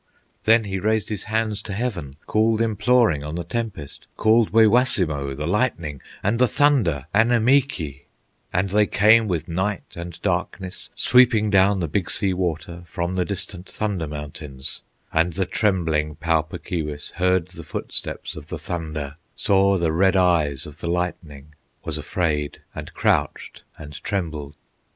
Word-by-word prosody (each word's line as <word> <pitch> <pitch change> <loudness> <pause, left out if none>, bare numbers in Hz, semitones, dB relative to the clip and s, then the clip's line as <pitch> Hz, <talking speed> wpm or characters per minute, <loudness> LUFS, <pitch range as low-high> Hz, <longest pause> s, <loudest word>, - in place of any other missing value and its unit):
Then 115 +1 +5
he 95 -2 -3
raised 110 0 0
his 105 -3 -3
hands 110 -1 -1
to 100 - -6
heaven, 95 - -3
Called 110 +1 +2
imploring 110 - +2
on 75 +2 -5
the 85 - -3
tempest, 95 -6 -5
Called 110 0 +4
Waywassimo, 100 - +3
the 75 +2 -4
lightning, 85 - -1 0.2
And 105 +4 +1
the 125 - +5
thunder, 110 - +2
Annemeekee; 115 - +2 0.4
And 90 +2 0
they 105 +1 +3
came 110 +2 +5
with 85 -5 -2
night 95 +3 -3
and 85 -1 -7
darkness, 95 -1 -2
Sweeping 120 -4 +4
down 95 0 +4
the 85 - -1
Big 90 +4 -1
Sea 95 -2 +1
Water 85 -1 -3
From 85 0 -3
the 90 -1 0
distant 95 -1 -4
Thunder 100 -7 -2
Mountains; 75 -2 -6 0.3
And 85 +2 +2
the 95 +1 0
trembling 85 -7 0
Pau 80 0 +1
Puk 75 - -10
Keewis 75 -4 -4
Heard 90 -1 +2
the 85 -2 -10
footsteps - - -4
of 75 -1 -10
the 80 - -5
thunder, 80 -3 -5 0.2
Saw 100 -1 +3
the 85 -3 +1
red 95 +4 +3
eyes 80 -7 +2
of 75 -1 -11
the 85 - -4
lightning, 80 -5 -4 0.3
Was 80 -1 -2
afraid, 75 -2 -2
and - - -7
crouched - - 0 0.2
and 75 -1 -10
trembled. 75 -7 -3
90 Hz, 150 wpm, -23 LUFS, 80-105 Hz, 0.4 s, Then